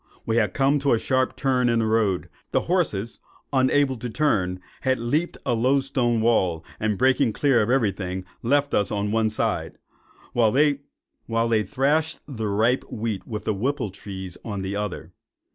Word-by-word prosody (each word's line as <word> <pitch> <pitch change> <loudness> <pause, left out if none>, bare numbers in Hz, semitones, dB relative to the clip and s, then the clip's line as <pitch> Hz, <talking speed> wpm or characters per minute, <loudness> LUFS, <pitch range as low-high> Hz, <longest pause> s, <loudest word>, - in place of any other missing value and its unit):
We 115 0 0
had 105 -3 +1
come 140 +1 +3
to 140 -1 +2
a - - +4
sharp 130 +2 0
turn 125 -2 +1
in 115 - +2
the 115 - +1
road; 110 -4 +2
and - - -19 0.2
the - - +3
horses, 135 - -1 0.3
unable 130 +1 +3
to 120 +2 -5
turn, 105 -9 0 0.2
had 130 -1 +1
leaped 145 +9 -1
a 125 - +1
low 130 +4 +3
stone 120 -4 0
wall, 95 -8 +2
and 105 -2 0
breaking 130 -1 +3
clear 135 -3 +3
of 105 - 0
every 125 -5 +3
thing, 95 -1 -5 0.2
left 145 +4 +1
us 100 - +2
on 105 0 -1
one 110 0 +2
side, 110 - -2 0.6
while 115 -2 +4
they 115 -5 0
thrashed 150 +3 +1
the 115 -7 -4
ripe 110 +5 +2
wheat 110 -3 -3
with 105 -2 -5
the 110 - 0
whippletrees 100 -6 -4
on 100 -4 -4
the 95 +1 -3
other. 100 -5 -4
115 Hz, 175 wpm, -24 LUFS, 105-135 Hz, 0.6 s, a